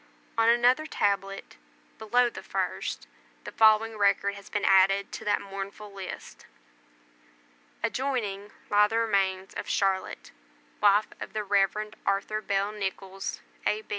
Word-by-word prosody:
On 230 0 +4
another 245 +6 +4
tablet, 195 -4 -2 0.4
below 245 +3 +3
the - - -8
first, - - -3 0.4
the - - -7
following 220 0 +4
record 200 0 +2
has 200 -1 -12
been 205 -1 -1
added 195 +1 +4
to - - -7
that 205 0 +1
mournful 200 +1 -7
list: 195 -2 -9 1.4
ADJOINING 225 -5 -2 0.2
LIE 210 0 +6
THE 225 +2 -2
REMAINS 195 -4 0
OF - - -5
CHARLOTTE, 195 -1 -1 0.5
WIFE 205 +1 +4
OF - - -7
THE 215 - -2
REV. 205 +1 +1
ARTHUR 200 +2 0
BELL 200 0 0
NICHOLLS, 195 -1 -5 0.3
A. 215 +1 0
205 Hz, 130 wpm, -28 LUFS, 195-215 Hz, 1.4 s, LIE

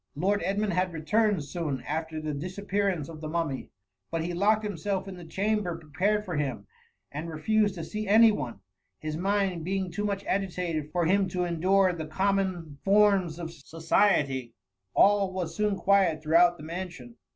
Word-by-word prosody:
Lord 195 +7 +1
Edmund 200 +2 0
had 180 0 0
re 160 - -5
* - - -13
turned 210 -2 +2
soon. 140 -3 -4
after 160 +1 -3
the 155 -1 -3
disappearance 185 +1 -2
of 160 -2 -10
the 155 - -5
Mummy; 155 -5 -2 0.4
but 165 -1 -2
he 175 +1 -3
locked 210 +5 +2
himself 195 -1 -2
in 190 - -7
the 175 - -10
cham 205 +6 0
^ - - -4
ber 175 -3 -3
prepared 190 +7 -1
for 175 -5 -3
him, 135 -8 -2 0.5
and 155 +4 -5
refused 205 +6 +1
to 165 - -5
see 210 +5 -4
any 220 +2 +7
one^ 120 - -5 0.4
his 155 0 -4
mind 190 -1 0
bring 190 +1 -2
too 205 - -3
much 200 -1 -2
agitated 175 -5 -2
for 175 0 +1
him 195 +3 +3
to 180 -1 -2
endure 185 +2 +2
the 160 -2 -5
common 185 -4 -1
forma 200 -1 +4
of 165 -1 -6
society* 150 - +1 0.4
All 200 -1 +4
was 185 -3 -3
soon 210 -1 +1
quiet 190 -6 +2
throughout 175 +3 +4
the 150 - -11
mansion. 165 -8 -7
180 Hz, 185 wpm, -28 LUFS, 160-200 Hz, 0.5 s, any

